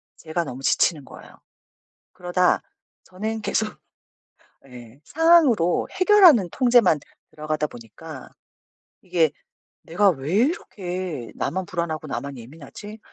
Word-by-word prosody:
제가 165 +1 -4
너무 130 -1 -8
지치는 150 +1 +1
거예요. - - -15 0.7
그러다 180 0 +1 0.4
저는 215 +4 -5
계속 215 0 -2 0.9
예 125 -1 -13
상황으로 300 - +3
해결하는 370 - +5
통제만 240 - +3 0.3
들어가다 155 0 -3
보니까 130 +5 -12 0.7
이게 175 -3 +1 0.6
'내가 190 +4 +3
왜 145 +3 -4
이렇게 185 - -2
나만 190 +2 -2
불안하고 170 -4 -4
나만 140 0 -5
예민하지?' 160 - -11
175 Hz, 255 characters per minute, -23 LUFS, 150-215 Hz, 0.9 s, 해결하는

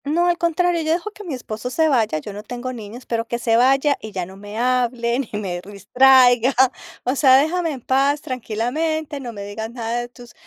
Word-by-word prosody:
No, 325 +5 +1
al 350 -1 +2
contrario, 345 0 +1
yo 315 0 +1
dejo 360 +5 -3
que 420 - -12
mi 330 -8 -4
esposo 230 -1 -6
se 320 +5 +2
vaya, 225 - +1
yo 175 +7 -7
no 205 - -7
tengo 245 +3 -6
niños, 230 +2 -9
pero 230 -1 -2
que 235 - -2
se 230 -1 +1
vaya 270 +4 +3
y 220 - -8
ya 185 -3 -3
no 190 +2 -13
me 205 +2 -9
hable, 245 0 0
ni 220 -6 -4
me 180 -4 -4
distraiga, 245 +5 +4 0.5
o 255 - 0
sea, 265 -2 +6
déjame 330 +4 +1
en 260 - -8
paz, 275 +4 +2
tranquilamente, 280 +6 -3
no 250 -3 -6
me 205 -3 -8
digas 210 +2 -6
nada 235 0 -3
de 240 - -4
tus 245 -1 -15
250 Hz, 220 wpm, -21 LUFS, 225-285 Hz, 0.5 s, sea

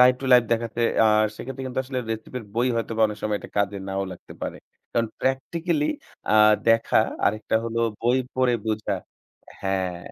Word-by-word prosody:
live 125 0 +7
to - - -6
live 125 -1 +7
দেখাচ্ছে। 115 0 -1 0.2
আর 110 0 +4
সেক্ষেত্রে 135 +1 -6
কিন্তু 130 0 -4
আসলে 130 0 -3
রেসিপির 115 +1 -5
বই 120 +2 +2
হয়তোবা 115 0 -2
অনেক 105 0 -6
সময় 105 -1 0
এটা - - -9
কাজে 100 0 +1
নাও 95 0 -1
লাগতে 90 - -12
পারে। - - -3 0.4
কারণ 115 -1 +1
প্র্যাকটিক্যালি 150 +4 0 0.4
আ - - +3 0.4
দেখা 115 0 +4 0.3
আরেকটা 110 +1 -1
হল 115 0 -4 0.2
বই 120 +3 +3 0.2
পড়ে 130 -1 +3
বোঝা 105 -2 -1 0.7
হ্যাঁ। 95 -2 -1
115 Hz, 165 wpm, -24 LUFS, 105-125 Hz, 0.7 s, live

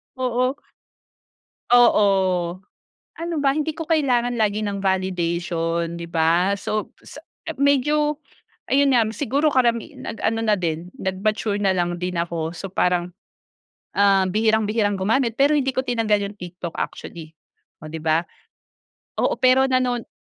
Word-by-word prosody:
Oo. 255 0 0 1.1
Oo. 190 -7 +3 0.6
Ano 335 0 -3
ba 275 - +4
hindi 310 +1 -2
ko 325 - -6
kailangan 250 -7 +1
lagi 215 0 +1
ng 205 -1 -2
validation, 170 -3 -1
'di 170 - -6
ba? 170 +4 +2
So, 215 +1 -3
sa - - -12 0.3
ah, - - -5
medyo 295 +2 +2 0.5
ayun 275 0 +4
nga 235 - +5
m - - -3
siguro 285 +5 +1
karami 235 -4 +1
nag 225 - -7
ano 225 0 0
na 215 - +2
din 170 +1 -3
nag 190 0 -3
mature 215 -1 0
na 195 -2 +1
lang 175 -1 -1
din 180 +1 -3
ako. 170 -1 -3
So, 190 +2 -7
parang, 180 -1 0 0.8
ah, 195 -1 +4
bihirang 220 +2 +2
bihirang 205 -2 0
gumamit 225 +4 +1
pero 285 +2 +4
hindi 270 -2 +1
ko 260 - 0
tinangal 220 -4 +1
yung 205 - -14
TikTok 175 -1 -7
actually, 160 -1 -6 0.5
oh, 155 - -8
'di 160 - -5
ba? 160 +2 +1 0.9
Oo - - +1
pero 260 +1 +5
nanon 250 -2 0
210 Hz, 150 wpm, -22 LUFS, 180-255 Hz, 1.1 s, nga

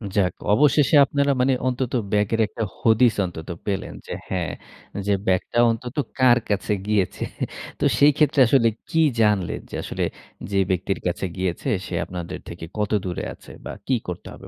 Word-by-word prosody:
যাক 95 -3 +2 0.2
অবশেষে 150 +3 +4
আপনারা 140 0 +1
মানে 130 +1 +3
অন্তত 130 0 -1 0.2
ব্যাগের 105 +2 +1
একটা 115 - -4 0.2
হদিস 115 +1 +4
অন্তত 85 -1 -8 0.2
পেলেন 100 -2 -2
যে, - - -4 0.2
হ্যাঁ, 90 -5 -1 0.6
যে 100 - +3
ব্যাগটা 95 +6 +1
অন্তত 120 +2 -5 0.2
কার 125 -2 +6
কাছে 105 +1 0
গিয়েছে। 105 -4 0 0.6
তো - - +1
সেই 145 +1 +7
ক্ষেত্রে 150 -2 +3
আসলে 115 -1 +4 0.2
কি 160 - +2 0.2
জানলেন 105 -4 +2
যে - - -7
আসলে - - -3 0.5
যে 100 - +2
ব্যক্তির 95 +1 -1
কাছে 90 +2 -2
গিয়েছে 90 -2 -2 0.2
সে - - -5
আপনাদের 90 0 -6
থেকে 80 -1 -7
কত 105 -1 -1
দূরে 90 -2 -3
আছে - - -15
বা - - -4 0.2
কি 130 - +3
করতে 90 0 -6
হবে - - -12
105 Hz, 165 wpm, -23 LUFS, 90-130 Hz, 0.6 s, সেই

